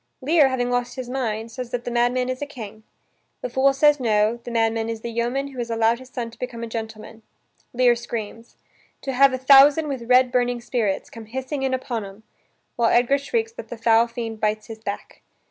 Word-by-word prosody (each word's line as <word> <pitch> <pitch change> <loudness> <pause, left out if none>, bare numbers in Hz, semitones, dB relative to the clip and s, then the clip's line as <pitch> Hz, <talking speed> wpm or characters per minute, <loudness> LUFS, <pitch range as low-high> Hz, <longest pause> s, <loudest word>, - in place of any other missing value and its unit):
Lear, 295 +1 +4
having 245 -1 -1
lost 245 0 -1
his 255 -2 -6
mind, 225 -4 -3
says 245 +1 -6
that 245 0 -3
the 245 - -4
madman 245 +1 +1
is 255 +1 -4
a 290 - -3
king. 220 -6 -9 0.6
The - - -4
fool 270 +1 +4
says 295 +1 +4
no, 220 -1 +2
the 235 0 -10
madman 225 -1 0
is 225 -1 -4
the 235 - -5
yeoman 240 +4 -1
who 265 -2 -10
has 235 -1 -3
allowed 230 +1 +2
his 260 0 -13
son 235 -3 -5
to - - -18
become 235 -2 -5
a - - -4
gentleman. 220 0 -7 0.5
Lear 245 -1 +4
screams: 230 -1 -7 0.5
"To 270 - -3
have 275 +2 +5
a 260 - -2
thousand 280 +4 +6
with 250 -4 -5
red 250 0 +5
burning 245 -1 +1
spirits. 230 -5 -2
Come 230 -1 -10
hissing 265 +5 -4
in 265 -1 +1
upon 240 -4 -4
'em," 200 +2 -11 0.5
while 235 -1 +3
Edgar 245 +4 +3
shrieks 450 - -2
that 460 - -9
the 240 - -8
foul 230 +1 +4
fiend 230 -2 -6
bites 215 0 -1
his 225 -1 -9
back. 205 -2 -7
240 Hz, 215 wpm, -23 LUFS, 225-260 Hz, 0.6 s, thousand